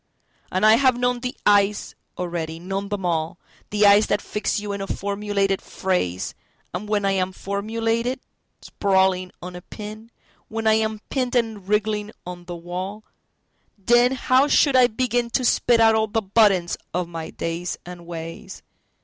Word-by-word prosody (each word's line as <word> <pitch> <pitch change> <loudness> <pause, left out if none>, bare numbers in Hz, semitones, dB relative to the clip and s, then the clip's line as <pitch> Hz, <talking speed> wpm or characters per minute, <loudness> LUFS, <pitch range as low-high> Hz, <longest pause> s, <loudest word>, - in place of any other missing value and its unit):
And 185 +3 +1
I 215 +1 +7
have 260 -2 +3
known 245 0 +1
the 250 +1 -5
eyes 205 0 +3 0.2
already, 170 -2 -3
known 195 +3 -4
them 205 -3 -3
all—The 175 +5 -2
eyes 205 +1 +6
that 205 - +1
fix 210 +1 -2
you 205 0 -5
in 200 0 -4
a 195 - -4
formulated 200 -1 -1
phrase, 95 - -2 0.4
And 205 +4 -5
when 205 -1 +1
I 195 - +3
am 190 -1 0
formulated, 225 +6 -2 0.4
sprawling 190 -2 +1
on 180 0 -7
a 180 - -8
pin, 215 +3 -9 0.4
When 225 0 -4
I 220 - +5
am 220 -1 0
pinned 255 -2 -1
and 220 -5 -1
wriggling 210 0 0 0.2
on 175 0 -8
the 175 0 -6
wall, 185 +5 -6 0.7
Then 240 +5 +4
how 260 +2 +3
should 285 -2 +4
I 255 -1 +7
beginTo 245 +1 0
spit 240 0 +3
out 225 -1 +6
all 220 0 +2
the 220 +1 -1
butt 210 +2 +5
ends 175 -3 -2 0.2
of 180 -1 -1
my 165 -1 -6
days 170 +2 -4
and 175 -1 -10
ways? 165 -1 -8
205 Hz, 165 wpm, -23 LUFS, 180-225 Hz, 0.7 s, I